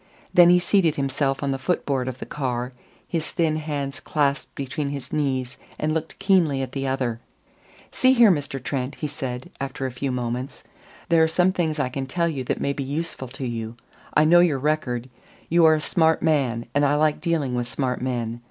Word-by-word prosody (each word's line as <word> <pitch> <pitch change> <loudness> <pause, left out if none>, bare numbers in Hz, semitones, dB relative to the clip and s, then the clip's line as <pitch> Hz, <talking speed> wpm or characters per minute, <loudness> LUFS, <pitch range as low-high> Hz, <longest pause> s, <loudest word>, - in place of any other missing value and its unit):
Then 175 -1 +8
he 180 - +7
seated 175 -3 +2
himself 135 0 -1
on 140 - 0
the 135 - -2
foot 175 +7 -1
board 130 -3 -1
of 130 -1 -4
the - - -7
car, 125 -3 -3 0.3
his 165 -3 -2
thin 160 -2 0
hands 145 -3 -4
clasped 145 -2 -1
between 140 +2 -3
his 140 -2 -6
knees, 130 -4 -1 0.2
and 155 0 0
looked 160 0 -3
keenly 175 -9 +2
at 130 - -6
the 135 -1 -3
other. 130 -4 -1 0.7
"See 255 0 +4
here, 235 -5 +7
Mr. 145 -4 -2
Trent," 130 +1 -3
he - - -5
said 130 -4 -5
after 135 0 -3
a 130 - -2
few 130 +2 -3
moments. 125 +2 -4 0.5
"There 165 -1 +5
are 160 - +5
some 180 +3 +3
things 165 -4 -1
I 130 -3 0
can 135 +1 -4
tell 170 +5 0
you 140 -6 -3
that - - -1
may 140 - 0
be 140 - -4
useful 145 -1 -4
to 135 +2 -6
you. 115 -1 -4 0.4
I 150 - +5
know 175 +3 +7
your 170 -5 +4
record. 130 -4 -1 0.4
You 170 0 +5
are 160 0 +7
a - - -1
smart 160 +1 +2
man, 130 -7 +1
and 145 - +2
I 145 0 +3
like 150 0 +2
dealing 160 -7 0
with 120 -1 -1
smart 125 -1 -2
men. 120 -2 -2
140 Hz, 205 wpm, -24 LUFS, 130-160 Hz, 0.7 s, Then